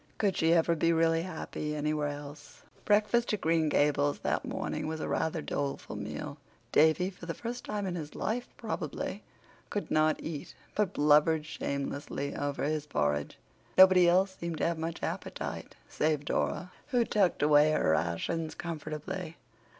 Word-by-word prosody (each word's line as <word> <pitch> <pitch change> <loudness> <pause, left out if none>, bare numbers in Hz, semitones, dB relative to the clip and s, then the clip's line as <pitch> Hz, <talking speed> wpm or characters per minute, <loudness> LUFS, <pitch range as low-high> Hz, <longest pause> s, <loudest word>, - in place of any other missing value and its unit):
Could 200 -4 +1
she 160 0 +3
ever 170 0 +3
be 165 +1 +2
really 165 0 +3
happy 160 -3 -4
anywhere 150 0 0
else? 145 0 -9 0.2
Breakfast 215 +3 +3
at 210 - -1
Green 160 -1 +2
Gables 145 -1 +2
that - - 0
morning - - -3
was 160 0 -3
a - - -3
rather 160 -1 -1
doleful 140 -5 -3
meal. 140 +8 -6 0.3
Davy, 160 +5 +4
for 180 -2 -11
the 165 - -3
first 240 +1 -5
time 210 -1 -2
in 185 - -2
his 155 -4 -6
life 240 +3 -2
probably, - - -4 0.5
could 205 - -3
not 155 0 +3
eat, 155 -3 -6 0.2
but 210 -4 0
blubbered 150 +1 +4
shamelessly 140 -1 -3
over 145 0 -2
his 150 +1 -1
porridge. 75 - -1 0.4
Nobody 185 -2 +8
else 190 +2 +3
seemed 170 -3 -4
to - - 0
have 165 -1 0
much 165 +1 -4
appetite, - - -4
save 150 -1 0
Dora, 180 +4 -1 0.2
who 245 -3 +2
tucked 195 -9 +2
away 150 0 +6
her 80 - +2
rations 85 - -1
comfortably. 160 +1 -5
160 Hz, 160 wpm, -30 LUFS, 145-180 Hz, 0.5 s, Nobody